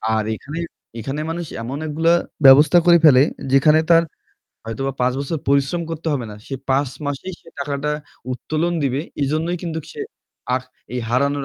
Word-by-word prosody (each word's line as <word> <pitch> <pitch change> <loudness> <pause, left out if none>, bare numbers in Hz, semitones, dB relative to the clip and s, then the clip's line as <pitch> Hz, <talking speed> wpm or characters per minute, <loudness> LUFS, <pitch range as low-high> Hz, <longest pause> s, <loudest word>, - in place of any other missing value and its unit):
আর 110 - +1
এখানে, 150 +8 -7 0.4
এখানে 135 +6 -4
মানুষ 170 +1 -3 0.2
এমন 125 +5 -4
একগুলা 160 +3 +2 0.3
ব্যবস্থা 140 +5 +8
করে 175 -1 +7
ফেলে 130 -4 +8 0.3
যেখানে 150 +3 +5
তার 165 -1 +6 0.6
হয়তোবা 135 +5 -3
৫ 125 +1 +2
বছর 150 +3 -3
পরিশ্রম 140 +5 +2
করতে 165 0 -6
হবে 130 -5 -2
না। - - -8
সে 135 - -5 0.2
৫ 135 +1 +2 0.2
মাসেই 145 +6 -4
সে 165 - -18
টাকাটা 140 +1 -2 0.4
উত্তোলন 155 +7 -2
দিবে। 135 0 0 0.2
এজন্যই 155 +5 0
কিন্তুক 160 -3 -4
সে - - -8 0.5
আর 130 - 0 0.3
এই 125 - -2
হারানোর 140 +3 +1
145 Hz, 165 wpm, -21 LUFS, 135-160 Hz, 0.6 s, ব্যবস্থা